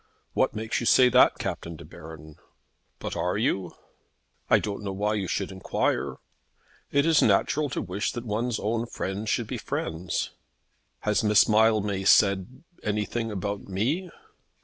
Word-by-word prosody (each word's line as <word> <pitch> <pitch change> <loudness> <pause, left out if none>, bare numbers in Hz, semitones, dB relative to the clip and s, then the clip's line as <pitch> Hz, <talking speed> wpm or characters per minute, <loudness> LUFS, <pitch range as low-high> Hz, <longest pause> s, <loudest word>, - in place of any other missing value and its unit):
"What - - +1
makes 110 +1 -2
you 120 - -2
say 125 -1 +6
that, 125 +1 +5
Captain 85 0 -4
De 75 - -11
Baron?" 80 -1 -12 0.6
"But - - -5
are - - -1
you?" 90 -3 -1 0.7
"I - - +6
don't 105 -1 -3
know 100 -2 -4
why 105 +2 -1
you 100 -3 -2
should 100 +2 -2
enquire." 95 0 -1 0.8
"It 140 +1 +3
is 165 -2 +4
natural 150 -1 +2
to - - -3
wish 100 +3 -2
that 120 0 -6
one's 115 +2 -1
own 115 +2 -1
friends 100 0 -4
should 120 - 0
be - - -5
friends." 80 +1 -3 0.7
"Has - - +1
Miss 105 -1 +5
Mildmay 105 -3 +2
said 100 - +3 0.2
anything 105 +2 -2
about 100 0 -4
me?" 130 - -1
105 Hz, 150 wpm, -26 LUFS, 95-115 Hz, 0.8 s, say